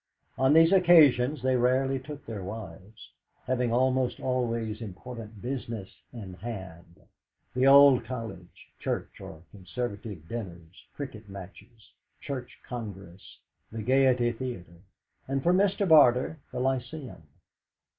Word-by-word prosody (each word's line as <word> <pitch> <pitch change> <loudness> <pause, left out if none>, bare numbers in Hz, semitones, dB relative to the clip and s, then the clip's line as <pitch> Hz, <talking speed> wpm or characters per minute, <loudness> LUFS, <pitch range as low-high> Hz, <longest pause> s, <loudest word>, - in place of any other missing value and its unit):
On 130 +2 +3
these 165 +2 +6
occasions 155 -8 +5
they 130 0 +2
rarely 130 +2 +2
took 145 +2 -10
their 105 -4 -6
wives, 105 0 -9 0.3
having 125 -2 0
almost 130 +1 +1
always 115 -4 -2
important 110 +1 -9
business 115 -6 -5 0.2
in 105 -6 -9
hand 90 -5 -9 0.6
old 135 0 +7
College, 115 -7 -8
Church, - - -4
or 80 +1 -10
Conservative 100 -3 -6
dinners, 90 -6 -8
cricket 115 -7 -8
matches, 100 +4 -12 0.3
Church 130 -3 -6
Congress, 100 -6 -9 0.3
the 110 -1 -5
Gaiety 125 -1 +3
Theatre, 115 -9 -7 0.5
and 135 0 -2
for 175 - +3
Mr. 200 +1 +2
Barter 150 -1 +5
the 125 - -4
Lyceum. 130 - -3
120 Hz, 115 wpm, -28 LUFS, 105-130 Hz, 0.6 s, old